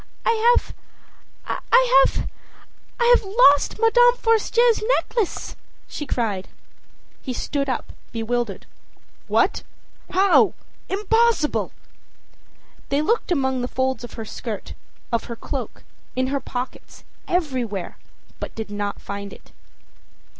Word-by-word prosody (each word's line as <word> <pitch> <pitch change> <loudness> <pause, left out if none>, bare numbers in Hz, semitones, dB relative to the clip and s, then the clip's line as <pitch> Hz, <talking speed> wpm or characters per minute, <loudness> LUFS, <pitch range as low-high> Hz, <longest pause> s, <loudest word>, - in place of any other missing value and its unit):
âI 460 +1 +4
have - - -1 1.0
I - - +6
have - - -3 0.7
I've 485 0 +5
lost 390 - +4
Madame 485 +2 +5
Forestier's 455 0 +3 0.2
necklace,â 440 -7 -2 0.3
she 295 - -6
cried. 210 -7 -1 0.7
He 260 - -4
stood 275 +2 -2
up, 255 - -3 0.2
bewildered. 230 -3 -2 0.6
âWhat! - - +2 0.5
how? 380 +1 +4 0.3
Impossible!â 425 -3 +2 1.2
They 280 +2 +1
looked 450 +1 0
among 265 -5 +1
the 245 - -2
folds 260 0 -1
of 240 - -9
her 225 - -6
skirt, 220 -1 -6 0.4
of 230 -1 0
her 235 - -6
cloak, - - -6 0.3
in 255 0 +1
her 280 - +1
pockets, 250 -1 -7 0.2
everywhere, 255 - -2 0.4
but - - -6
did 220 -2 -6
not 205 0 -3
find 200 0 -6
it. - - -15
280 Hz, 110 wpm, -23 LUFS, -, 1.2 s, I